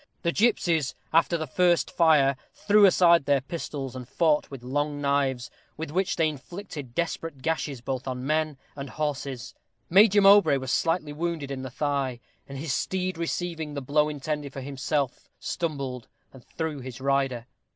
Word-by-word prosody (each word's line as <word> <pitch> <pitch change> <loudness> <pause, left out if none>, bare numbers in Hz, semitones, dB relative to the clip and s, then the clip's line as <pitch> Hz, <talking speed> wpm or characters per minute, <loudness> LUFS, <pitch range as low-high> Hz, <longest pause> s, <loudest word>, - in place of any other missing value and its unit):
The 170 - +2
gipsies, 170 - +1 0.2
after 165 +1 +3
the 160 - -3
first 170 +1 +2
fire, 150 -5 +4 0.2
threw 210 0 +5
aside 170 -4 +5
their 140 -1 +3
pistols, 135 -3 -5
and 125 -1 -8
fought 155 +1 +2
with 135 -3 -9
long 145 +3 -2
knives, 140 -3 0 0.3
with 160 -1 -5
which 185 +3 0
they 165 -2 +2
inflicted 150 -3 -7
desperate 165 -4 -3
gashes, 150 -5 -2
both 130 +1 -4
on 130 0 -4
men 155 0 0 0.2
and 140 -1 -6
horses. 140 -5 -4 0.4
Major 205 +2 +7
Mowbray 195 -7 +7
was 130 -1 -4
slightly 165 -3 0
wounded 160 -3 -3
in 135 -1 -4
the 130 - -6
thigh, 135 -2 -2 0.3
and 135 - -7
his 145 0 -2
steed 185 -1 -1
receiving 165 -3 -3
the - - -2
blow 150 +3 +2
intended 150 -1 -4
for 135 - -6
himself, 140 0 -2
stumbled 140 -7 -4 0.3
and 130 -2 -14
threw 160 -3 -4
his 130 -1 -8
rider. 135 -3 0
145 Hz, 160 wpm, -26 LUFS, 135-165 Hz, 0.4 s, Major